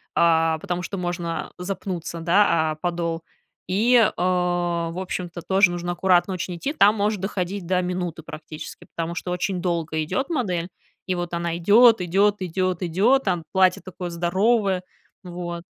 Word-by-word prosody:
а, 165 -1 +3
потому 175 +2 -3
что 195 - -5
можно 175 -2 -3
запнуться, 180 -2 -5
да, 170 -2 +3
о - - -4
подол, 170 0 -2 0.5
И, 230 +6 +3
э, 230 - +5
в 175 -1 0
общем-то, 175 -2 -5
тоже 190 -1 +4
нужно 175 0 -3
аккуратно 180 +1 +2
очень 180 -1 -4
идти. 275 - -3
Там 210 -7 +5
может 210 -1 0
доходить 190 -1 -3
до 185 0 +2
минуты 180 -3 -3
практически, 155 0 -9
потому 165 0 -2
что 180 - -5
очень 180 +1 -2
долго 165 -3 -1
идёт 265 - -2
модель, 185 - -1 0.4
и 185 - -1
вот 175 -1 -3
она 170 -1 -2
идёт, 220 +5 +6
идёт, 200 +4 +2
идёт, 185 -1 -1
идёт, 200 +10 +3
там 175 -4 0
платье 185 -1 +3
такое 180 -1 -6
здоровое. 190 +3 +1 0.4
Вот. 175 -1 -6
180 Hz, 155 wpm, -23 LUFS, 170-190 Hz, 0.5 s, идёт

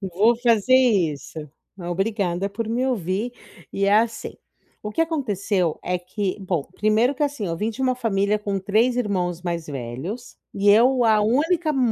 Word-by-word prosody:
Vou 205 +5 +2
fazer 235 0 +3
isso. 165 - +1 0.3
E - - -9
obrigada 195 0 -1
por 220 +2 -4
me 245 +3 0
ouvir 215 0 -2 0.4
e 195 - -1
é 200 - +4
assim. 225 +1 0 0.5
O 210 - -4
que 270 - -3
aconteceu 205 - 0
é 180 - -1
que 185 +2 -3
bom, 180 -5 -1
primeiro 215 +6 +2
que 290 - -3
assim, 285 -8 -1
eu 165 -1 -3
vim 215 +6 -1
de 240 - -9
uma 255 -1 +2
família 210 -4 0
com 200 -2 -3
3 220 +6 +1
irmãos 185 -7 -1
mais 170 -2 -4
velhos 140 - -6 0.2
e 200 +1 0
eu, 245 +4 +5
a 220 -2 +4
única 310 +10 +1
m 275 - -2
210 Hz, 175 wpm, -23 LUFS, 185-240 Hz, 0.5 s, eu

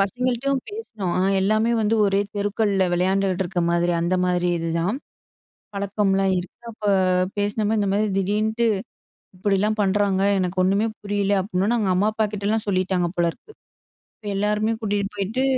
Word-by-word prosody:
பசங்கள்ட்டயும் 250 +6 0
பேசினோம். 230 - -5
ஆ - - +2 0.2
எல்லாமே 215 +4 +2
வந்து 215 +1 +2
ஒரே 195 0 +2 0.2
தெருக்கள்ல 205 -1 +1
வெளையாண்டுட்டு 190 +1 +1
இருக்க 175 0 -2
மாரி, 170 0 +1
அந்த 175 +2 +1
மாரி 180 0 +1
இதுதான். 165 +6 -1 0.8
பழக்கம்லாம் 195 -1 +1
இருக்கு. 175 0 -8
அப்ப 220 - -17 0.6
பேசின 205 +1 0
மாரி, 220 0 +1
"இந்த 200 - 0
மாரி 205 +2 +2
திடீர்ன்ட்டு 215 +4 0 0.7
இப்படிலாம் 205 +2 0
பண்ணுறாங்க. 195 -1 +1 0.2
எனக்கு 185 0 -1
ஒண்ணுமே 200 +4 +2
புரியல." 205 -1 0
அப்டீன்னொன்னே 200 +4 0
அவங்க 200 -4 +1
அம்மா, 205 +4 +2
அப்பாகிட்டலாம் 215 0 -1
சொல்லிட்டாங்க 185 -2 +1
போலருக்கு. 175 - -2 0.7
இப்போ 210 - -11
எல்லாருமே 210 +2 +1
கூட்டிட்டு 205 -1 -1
போயிட்டு, 205 +6 -1
200 Hz, 140 wpm, -23 LUFS, 190-215 Hz, 0.8 s, ஆ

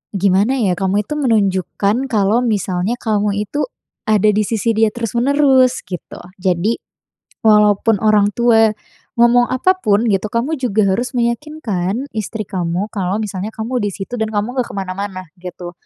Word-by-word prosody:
gimana 200 +7 +2
ya, 190 -4 +2
kamu 195 +2 0
itu - - -3
menunjukkan 210 0 +1
kalau 215 +3 +2
misalnya 200 -1 -1
kamu 210 -2 0
itu 295 - -2 0.4
ada 215 -1 +4
di 210 - 0
sisi 230 0 0
dia 220 0 +4
terus-menerus 255 +3 +2
gitu, 180 -2 -7 0.2
jadi 185 +4 +1 0.7
walaupun 210 0 +4
orang 210 -2 +4
tua 225 -2 +4 0.5
ngomong 240 +1 +5
apapun 255 - +2
gitu, 195 0 +1
kamu 245 +7 0
juga 215 -4 +1
harus 245 +4 -3
meyakinkan 235 - -2
istri 215 0 -4
kamu 180 +2 -2
kalau 190 -1 -1
misalnya 200 0 -4
kamu 240 +3 -2
di 205 - 0
situ 195 +5 -6
dan 220 - 0
kamu 210 +4 -2
nggak 245 - 0
ke - - -8
mana-mana 190 0 -4 0.2
gitu. 180 -1 -8
215 Hz, 150 wpm, -17 LUFS, 195-240 Hz, 0.7 s, ngomong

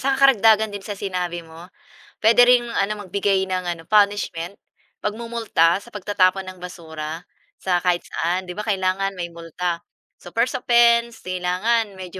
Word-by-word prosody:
saka 270 0 +1
karagdagan 220 -4 +5
din 205 - -5
sa 200 +1 -6
sinabi 180 -3 -3
mo, 165 +2 -13 0.5
puwede 230 +2 +6
ring 245 -1 +5
ano, 205 +1 0
magbigay 195 0 +1
ng 185 -1 -2
ano, 170 -2 -4
punishment, 200 -4 +1 0.4
pagmumulta 220 -6 0
sa 205 - -17
pagtatapon 195 -1 +1
ng 185 - -17
basura, 165 -2 -7 0.3
sa 180 -2 0
kahit 175 -1 0
saan, 180 +3 -2
'di 180 - -8
ba, 210 +4 -6
kailangan 195 -1 0
may 170 -1 -5
multa. 170 +1 -4 0.4
So, - - -10
first 230 +2 +1
offense, 235 -1 +3
kailangan 185 +4 0
medyo 185 0 -8
190 Hz, 155 wpm, -22 LUFS, 180-215 Hz, 0.5 s, puwede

